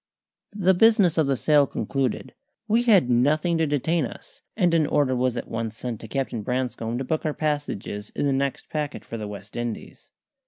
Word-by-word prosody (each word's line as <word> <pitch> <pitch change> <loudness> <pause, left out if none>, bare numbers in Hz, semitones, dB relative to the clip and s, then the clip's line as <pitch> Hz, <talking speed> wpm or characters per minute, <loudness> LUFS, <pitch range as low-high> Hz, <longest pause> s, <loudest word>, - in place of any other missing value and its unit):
The 190 -2 +3
business 200 -4 +4
of 155 - +3
the 135 -1 +1
sale 145 0 +4
concluded, 135 -2 -2 0.3
we 225 +2 +3
had 210 - +5
nothing 150 +8 +2
to 160 - +2
detain 150 +3 +1
us, - - -13 0.2
and 175 -5 +3
an 160 -3 +3
order 140 -4 +2
was 125 -1 0
at - - -4
once 115 -1 -4
sent 120 -3 -5
to 115 - -8
Captain 130 -2 -2
Branscome 120 0 -2
to 130 - -2
book 155 +4 -2
our 155 -2 -1
passages 145 -9 -3
in - - 0
the 140 - +2
next 135 0 -2
packet 150 -2 -4
for 115 - -6
the 105 - -5
West 105 0 -9
Indies. 120 -1 -6
140 Hz, 195 wpm, -25 LUFS, 120-160 Hz, 0.3 s, had